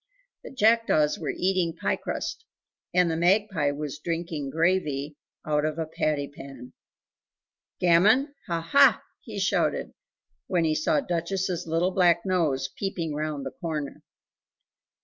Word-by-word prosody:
The - - -8
jackdaws 225 - +2
were - - -4
eating 185 -3 0
pie - - 0
crust, 450 - -5 0.5
and 180 -2 +3
the - - -1
magpie 180 -2 +2
was 145 0 -5
drinking 165 -3 -3
gravy 155 -3 0 0.3
out 150 -1 +1
of 155 0 -1
a 165 - -1
patty 150 -2 -1
pan. 135 -3 -11 1.1
"Gammon, 210 - +4
ha, 165 -1 -3
HA!" 280 -1 +7 0.2
he - - -9
shouted - - 0 0.5
when 175 -3 +1
he 155 - +2
saw 155 0 +1
Duchess's 175 +1 -2
little 165 +3 +1
black 175 -1 +3
nose 155 -8 +1
peeping 170 -5 -3
round 150 -2 -3
the 135 - -4
corner. 150 0 -5
165 Hz, 130 wpm, -26 LUFS, 150-185 Hz, 1.1 s, HA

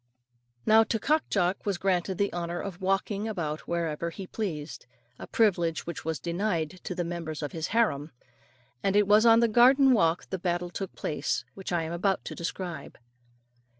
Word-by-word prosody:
Now 220 +1 +6
to 225 - 0
Cock 305 +8 +1
Jock 185 -1 +1
was 200 -3 -1
granted 185 0 0
the 200 0 0
honour 175 0 -3
of 190 -1 -6
walking 195 +2 0
about 160 -8 -4
wherever 170 -1 -2
he 190 +3 -8
pleased 165 - -5 0.3
a - - -8
privilege 175 -7 +1
which 170 - -6
was 160 -1 -2
denied 175 -1 -2
to 180 - -4
the 175 - -1
members 165 -3 -5
of 145 - -3
his 160 0 -3
harem, 160 -10 +1 0.7
and 195 0 +1
it 205 0 +5
was 210 +3 +6
on 230 0 +7
the 235 - +4
garden 255 +4 +6
walk 165 -6 +2
the 190 - -2
battle 175 0 -2
took 195 0 -5
place 150 - -2
which 190 -1 -7
I 170 -2 +1
am 160 +1 -4
about 190 +2 0
to - - -5
describe. 170 -3 -5
180 Hz, 185 wpm, -28 LUFS, 170-205 Hz, 0.7 s, on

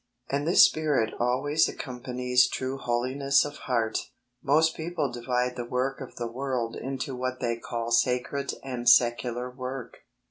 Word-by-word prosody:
And 145 +2 -1
this 175 - +8
spirit 150 -8 +1
always 135 +6 +2
accompanies 125 -1 0
true 130 +1 -3
Holiness 130 +4 +1
of 145 0 -7
heart. 115 -3 +1 0.4
Most 155 +4 +3
people 160 -4 -2
divide 125 +1 -1
the 120 - -4
work 130 +3 -2
of 130 - -9
the 120 - -4
world 120 -1 -3
into 135 +1 -4
what 130 0 -3
they 115 -2 -1
call 115 0 -4
sacred 125 +3 +1
and 125 -3 0
secular 120 0 +3
work. 130 0 -6
125 Hz, 145 wpm, -27 LUFS, 120-135 Hz, 0.4 s, this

